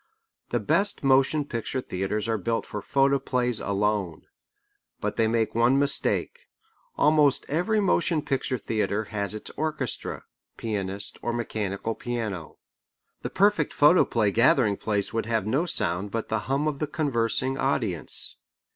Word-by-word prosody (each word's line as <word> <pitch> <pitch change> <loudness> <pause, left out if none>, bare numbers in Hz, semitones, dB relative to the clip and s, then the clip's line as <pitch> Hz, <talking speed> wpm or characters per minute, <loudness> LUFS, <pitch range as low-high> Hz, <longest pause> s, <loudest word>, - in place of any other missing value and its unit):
The - - 0
best 200 -4 0
motion 135 +2 +3
picture 120 0 -3
theatres 105 -1 -3
are 110 -1 0
built 115 +4 -1
for 105 - -6
photoplays 135 -3 +1
alone. 100 -4 -1 0.8
But - - -3
they 115 -1 +2
make 110 0 0
one 120 +4 +3
mistake. 145 - 0 0.5
Almost 150 -2 +4
every 180 +9 +1
motion 175 -5 +1
picture 130 -2 -1
theatre 110 -1 -1
has 100 0 0
its 110 - -7
orchestra, 150 -6 -3 0.3
pianist, 100 -3 -4
or 120 - -2
mechanical 110 -2 -3
piano. 110 -9 -5 0.6
The - - -4
perfect 195 -6 +2
photoplay 135 - +4
gathering 115 -1 +3
place 105 -1 -2
would 115 -1 -1
have 110 -3 0
no 135 +11 0
sound 95 - -1
but 115 +2 -4
the 110 - 0
hum 140 +3 +1
of 145 -2 -2
the 150 - -1
conversing 130 -3 0
audience. 110 - +1
120 Hz, 140 wpm, -26 LUFS, 105-140 Hz, 0.8 s, Almost